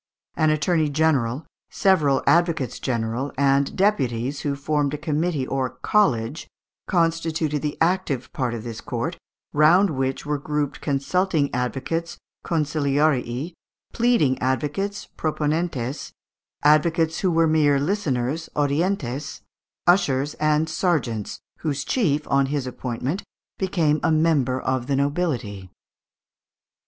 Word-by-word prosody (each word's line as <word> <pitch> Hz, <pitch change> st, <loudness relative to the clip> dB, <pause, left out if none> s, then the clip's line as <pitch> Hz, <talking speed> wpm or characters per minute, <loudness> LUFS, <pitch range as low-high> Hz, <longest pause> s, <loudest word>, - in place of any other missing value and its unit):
An 155 Hz, -, +3 dB
attorney 155 Hz, +1 st, +1 dB
general, 145 Hz, -3 st, +1 dB, 0.2 s
several 155 Hz, -8 st, +2 dB
advocates 165 Hz, -7 st, +2 dB
general, 120 Hz, +2 st, -2 dB
and 140 Hz, 0 st, +2 dB
deputies, 140 Hz, -, 0 dB
who 145 Hz, -1 st, -2 dB
formed 145 Hz, 0 st, 0 dB
a -, -, -5 dB
committee 155 Hz, -1 st, -1 dB
or 130 Hz, -1 st, -1 dB
college, 150 Hz, -, +1 dB, 0.4 s
constituted 165 Hz, -3 st, 0 dB
the 150 Hz, -1 st, -3 dB
active 165 Hz, -7 st, 0 dB
part 130 Hz, -7 st, -1 dB
of 110 Hz, -, -6 dB
this 115 Hz, -2 st, -6 dB
court, -, -, -4 dB, 0.3 s
round 170 Hz, +6 st, +5 dB
which 135 Hz, -1 st, -2 dB
were 150 Hz, -1 st, -1 dB
grouped 145 Hz, -1 st, -2 dB
consulting 150 Hz, +2 st, 0 dB
advocates 135 Hz, +7 st, -2 dB, 0.3 s
(consiliarii), 145 Hz, -2 st, 0 dB, 0.4 s
pleading 230 Hz, -, +2 dB
advocates 150 Hz, +10 st, -2 dB
(proponentes), 150 Hz, -4 st, -2 dB, 0.5 s
advocates 160 Hz, +2 st, +3 dB
who 190 Hz, -, +1 dB
were 165 Hz, -1 st, +3 dB
mere 150 Hz, -3 st, +3 dB
listeners 150 Hz, -4 st, -1 dB
(audientes), 145 Hz, -2 st, -1 dB, 0.4 s
ushers 145 Hz, -6 st, +3 dB
and 155 Hz, +1 st, +2 dB
serjeants, 150 Hz, -, -1 dB, 0.2 s
whose 145 Hz, -3 st, -2 dB
chief, 150 Hz, -, 0 dB
on 140 Hz, 0 st, +2 dB
his 140 Hz, -1 st, -2 dB
appointment, 130 Hz, -, -3 dB, 0.4 s
became 165 Hz, -5 st, +1 dB
a -, -, +2 dB
member 155 Hz, -5 st, +2 dB
of 130 Hz, -1 st, -2 dB
the 140 Hz, -, +1 dB
nobility. 135 Hz, -, -1 dB
150 Hz, 115 wpm, -23 LUFS, 135-165 Hz, 0.5 s, round